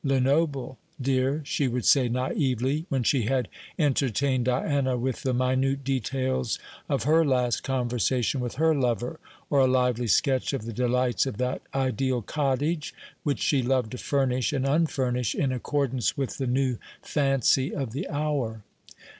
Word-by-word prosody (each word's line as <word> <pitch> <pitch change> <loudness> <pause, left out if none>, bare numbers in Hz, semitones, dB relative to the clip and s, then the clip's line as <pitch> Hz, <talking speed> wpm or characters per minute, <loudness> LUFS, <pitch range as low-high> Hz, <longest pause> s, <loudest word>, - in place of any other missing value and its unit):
Lenoble, 135 0 +1 0.2
dear," 135 +3 0
she 140 -1 0
would 125 -2 -2
say 130 -4 +5
naïvely, 130 +3 0
when 135 -2 0
she 125 -1 +2
had 125 -1 0 0.3
entertained 135 - +1
Diana 130 0 +1
with 125 +1 -2
the 130 - 0
minute 130 +2 +1
details 130 -1 -1 0.3
of - - 0
her 160 +4 +4
last 125 -5 +1
conversation 125 0 0
with 125 -1 -3
her 160 +3 +3
lover, 125 +1 -1 0.3
or 140 - +4
a 130 - +5
lively 125 -2 +1
sketch 130 +5 +2
of 130 -6 -3
the 115 - -5
delights 125 +2 +1
of 115 - -4
that 125 +1 -1
ideal 130 -2 0
cottage 145 +4 -1 0.3
which 145 -2 -1
she 140 -3 +2
loved 125 -3 0
to 125 - -6
furnish 130 -3 0
and 135 -1 0
unfurnish 130 -6 0
in 135 -2 0
accordance 130 0 -1
with 135 -2 -3
the 135 - -1
new 130 -1 +1 0.3
fancy 135 -2 +2
of 135 -6 -3
the 135 - -4
hour. 140 -7 -2
130 Hz, 155 wpm, -26 LUFS, 125-140 Hz, 0.3 s, say